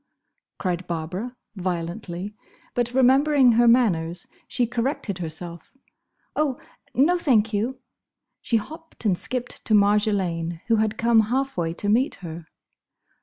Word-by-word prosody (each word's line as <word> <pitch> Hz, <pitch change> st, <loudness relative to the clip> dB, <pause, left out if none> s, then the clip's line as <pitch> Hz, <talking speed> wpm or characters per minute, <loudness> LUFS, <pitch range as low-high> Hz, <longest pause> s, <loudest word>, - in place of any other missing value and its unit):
cried 180 Hz, -1 st, -2 dB
Barbara, 180 Hz, +9 st, -4 dB, 0.2 s
violently, 180 Hz, +1 st, -4 dB, 0.4 s
but 240 Hz, -1 st, 0 dB
remembering 265 Hz, 0 st, +5 dB
her 235 Hz, +1 st, +4 dB
manners 180 Hz, -8 st, +3 dB, 0.2 s
she 245 Hz, -, +1 dB
corrected 235 Hz, -4 st, -2 dB
herself. 170 Hz, +1 st, -6 dB, 0.6 s
"Oh, 290 Hz, -4 st, +1 dB, 0.4 s
no, 340 Hz, +8 st, +4 dB
thank 225 Hz, -8 st, +2 dB
you!" 235 Hz, +6 st, -1 dB, 0.6 s
She 230 Hz, -, +1 dB
hopped 315 Hz, +4 st, -8 dB
and 195 Hz, -4 st, +3 dB
skipped 250 Hz, +6 st, -3 dB
to 215 Hz, -, +3 dB
Marjolaine, 195 Hz, -5 st, +2 dB
who 225 Hz, -, +4 dB
had 215 Hz, 0 st, 0 dB
come 230 Hz, -1 st, +4 dB
half 270 Hz, +2 st, 0 dB
way 165 Hz, -2 st, -1 dB
to 205 Hz, -, -3 dB
meet 245 Hz, +8 st, +2 dB
her. 165 Hz, 0 st, -8 dB
215 Hz, 125 wpm, -24 LUFS, 175-250 Hz, 0.6 s, remembering